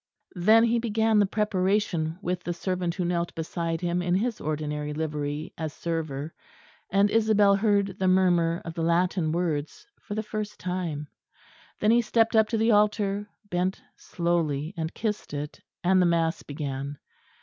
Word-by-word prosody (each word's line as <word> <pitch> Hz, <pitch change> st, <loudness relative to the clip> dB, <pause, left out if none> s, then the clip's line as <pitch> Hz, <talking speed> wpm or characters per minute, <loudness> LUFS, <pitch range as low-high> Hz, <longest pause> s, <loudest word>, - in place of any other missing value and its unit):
Then 215 Hz, +6 st, +5 dB
he 235 Hz, 0 st, +3 dB
began 220 Hz, -1 st, +2 dB
the 205 Hz, -, +4 dB
preparation 190 Hz, -5 st, 0 dB
with 180 Hz, 0 st, -1 dB
the 175 Hz, -, -3 dB
servant 180 Hz, -1 st, -2 dB
who 180 Hz, -, -1 dB
knelt 170 Hz, 0 st, -1 dB
beside 165 Hz, 0 st, -3 dB
him 175 Hz, 0 st, 0 dB
in 180 Hz, 0 st, +1 dB
his 225 Hz, +3 st, -1 dB
ordinary 150 Hz, -1 st, -3 dB
livery, 150 Hz, 0 st, -3 dB
as 155 Hz, -2 st, -3 dB
server; 160 Hz, -3 st, -3 dB, 0.6 s
and 200 Hz, +2 st, +3 dB
Isabel 215 Hz, -3 st, +4 dB
heard 200 Hz, -2 st, +1 dB
the 190 Hz, -, +1 dB
murmur 175 Hz, -3 st, +3 dB
of 165 Hz, -, -5 dB
the 165 Hz, -, -4 dB
Latin 170 Hz, 0 st, +1 dB
words 165 Hz, -, -2 dB
for 205 Hz, -, -7 dB
the 215 Hz, -, -2 dB
first 210 Hz, -1 st, -5 dB
time. 175 Hz, -5 st, -3 dB, 0.7 s
Then 215 Hz, -, +3 dB
he 240 Hz, +1 st, +5 dB
stepped 225 Hz, 0 st, +2 dB
up 220 Hz, -1 st, +5 dB
to 225 Hz, -, -1 dB
the 225 Hz, +1 st, +3 dB
altar, 205 Hz, -1 st, +2 dB, 0.2 s
bent 180 Hz, 0 st, -1 dB, 0.2 s
slowly 165 Hz, -2 st, -1 dB
and 160 Hz, -1 st, -3 dB
kissed 210 Hz, -8 st, -3 dB
it 145 Hz, +1 st, -6 dB, 0.2 s
and 185 Hz, +1 st, +4 dB
the 180 Hz, -, +4 dB
mass 165 Hz, -1 st, +1 dB
began. 140 Hz, -1 st, -5 dB
180 Hz, 160 wpm, -27 LUFS, 160-205 Hz, 0.7 s, Then